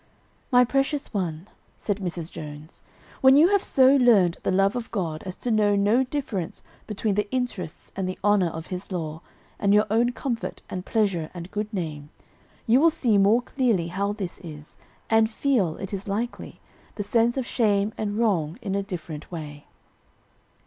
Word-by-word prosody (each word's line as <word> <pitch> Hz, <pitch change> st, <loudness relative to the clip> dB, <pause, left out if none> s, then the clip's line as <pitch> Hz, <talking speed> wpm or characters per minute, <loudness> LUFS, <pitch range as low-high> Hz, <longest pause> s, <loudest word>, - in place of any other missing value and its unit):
"My 250 Hz, -1 st, +6 dB
precious 275 Hz, +2 st, -1 dB
one," 175 Hz, -3 st, -3 dB, 0.3 s
said 205 Hz, -2 st, -2 dB
Mrs. 175 Hz, -4 st, -4 dB
Jones, 150 Hz, +1 st, -9 dB, 0.4 s
"when 265 Hz, 0 st, +7 dB
you 315 Hz, +5 st, +6 dB
have 405 Hz, -1 st, +3 dB
so 265 Hz, +1 st, +5 dB
learned 205 Hz, -9 st, +4 dB
the -, -, -1 dB
love 195 Hz, +3 st, +2 dB
of 245 Hz, -2 st, -4 dB
God 165 Hz, -8 st, -3 dB
as 185 Hz, -, -5 dB
to 245 Hz, -, -3 dB
know 210 Hz, -2 st, +3 dB
no 210 Hz, +6 st, +3 dB
difference 250 Hz, -, -4 dB, 0.2 s
between 210 Hz, 0 st, -1 dB
the 210 Hz, +1 st, -1 dB
interests 235 Hz, -10 st, -4 dB
and 190 Hz, -1 st, -2 dB
the 185 Hz, -, -5 dB
honor 205 Hz, -3 st, +4 dB
of 160 Hz, 0 st, -7 dB
his 180 Hz, +2 st, -6 dB
law, 160 Hz, -3 st, -4 dB, 0.4 s
and 200 Hz, 0 st, +3 dB
your 210 Hz, -, +5 dB
own 235 Hz, +2 st, +3 dB
comfort 240 Hz, -1 st, -4 dB
and 185 Hz, 0 st, -5 dB
pleasure 195 Hz, -8 st, 0 dB
and 175 Hz, +1 st, -8 dB
good 210 Hz, +1 st, -3 dB
name, 155 Hz, -7 st, -5 dB, 0.6 s
you 240 Hz, +2 st, +5 dB
will 330 Hz, +3 st, +6 dB
see 245 Hz, -10 st, +2 dB
more 215 Hz, +5 st, +4 dB
clearly 230 Hz, -12 st, 0 dB
how 200 Hz, +3 st, -1 dB
this 200 Hz, -4 st, -5 dB
is, 155 Hz, -4 st, -11 dB, 0.3 s
and 225 Hz, 0 st, +3 dB
feel, 220 Hz, -, 0 dB
it 195 Hz, +1 st, -6 dB
is 195 Hz, +1 st, -5 dB
likely, 225 Hz, +5 st, -4 dB, 0.4 s
the 205 Hz, -, -3 dB
sense 230 Hz, +4 st, +2 dB
of 260 Hz, -, -1 dB
shame 210 Hz, -4 st, +1 dB
and 210 Hz, -1 st, -3 dB
wrong 180 Hz, -8 st, +1 dB
in 205 Hz, -6 st, -4 dB
a 200 Hz, -, +1 dB
different 170 Hz, -6 st, -7 dB
way." 150 Hz, -4 st, -8 dB
205 Hz, 175 wpm, -25 LUFS, 175-235 Hz, 0.6 s, when